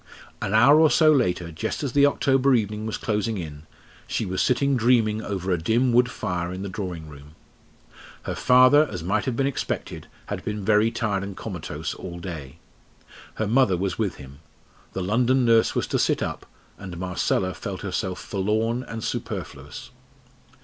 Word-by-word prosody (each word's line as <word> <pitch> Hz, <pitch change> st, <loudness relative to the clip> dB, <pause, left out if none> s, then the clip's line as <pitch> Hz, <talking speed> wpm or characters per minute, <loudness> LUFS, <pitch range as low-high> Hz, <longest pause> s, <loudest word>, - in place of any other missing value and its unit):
An 100 Hz, -, -1 dB
hour 140 Hz, +7 st, +7 dB
or 160 Hz, -1 st, +6 dB
so 155 Hz, 0 st, +5 dB
later, 90 Hz, -, +1 dB
just 80 Hz, -, -4 dB
as 140 Hz, -, -2 dB
the 140 Hz, +2 st, +5 dB
October 135 Hz, -1 st, +3 dB
evening 105 Hz, -1 st, -2 dB
was 110 Hz, -, -3 dB
closing 110 Hz, 0 st, -1 dB
in, 75 Hz, -3 st, -8 dB, 0.4 s
she -, -, -2 dB
was 95 Hz, 0 st, -2 dB
sitting 140 Hz, +2 st, +2 dB
dreaming 115 Hz, -3 st, +2 dB
over 95 Hz, -3 st, -3 dB
a 90 Hz, -, +1 dB
dim 120 Hz, +7 st, +2 dB
wood 125 Hz, +1 st, +4 dB
fire 90 Hz, -6 st, -3 dB
in 95 Hz, +1 st, -5 dB
the 100 Hz, -, -4 dB
drawing 90 Hz, -5 st, -5 dB
room. 75 Hz, +1 st, -13 dB, 0.9 s
Her -, -, -3 dB
father, 130 Hz, +4 st, +5 dB
as 90 Hz, -5 st, -5 dB
might 95 Hz, +4 st, 0 dB
have 130 Hz, -3 st, -1 dB
been 135 Hz, -, +1 dB
expected, 140 Hz, -, -4 dB, 0.2 s
had -, -, -5 dB
been 105 Hz, -2 st, -4 dB
very 105 Hz, +1 st, +4 dB
tired 110 Hz, -4 st, -1 dB
and 100 Hz, -1 st, -7 dB
comatose 75 Hz, +1 st, -5 dB
all 85 Hz, -2 st, -8 dB
day. 80 Hz, -7 st, -7 dB, 0.8 s
Her 110 Hz, -, -1 dB
mother 110 Hz, -4 st, +3 dB
was 95 Hz, +4 st, -2 dB
with 105 Hz, -4 st, -1 dB
him; 70 Hz, 0 st, -12 dB, 0.5 s
the 95 Hz, -, -3 dB
London 125 Hz, +6 st, +2 dB
nurse 115 Hz, -1 st, +4 dB
was -, -, 0 dB
to -, -, -1 dB
sit -, -, +1 dB
up, -, -, -5 dB, 0.3 s
and 95 Hz, -3 st, -8 dB
Marcella 95 Hz, +1 st, -1 dB
felt -, -, -6 dB
herself 95 Hz, -1 st, -3 dB
forlorn 110 Hz, +4 st, -1 dB
and 115 Hz, -3 st, -7 dB
superfluous. 95 Hz, -, -6 dB
105 Hz, 175 wpm, -24 LUFS, 90-125 Hz, 0.9 s, hour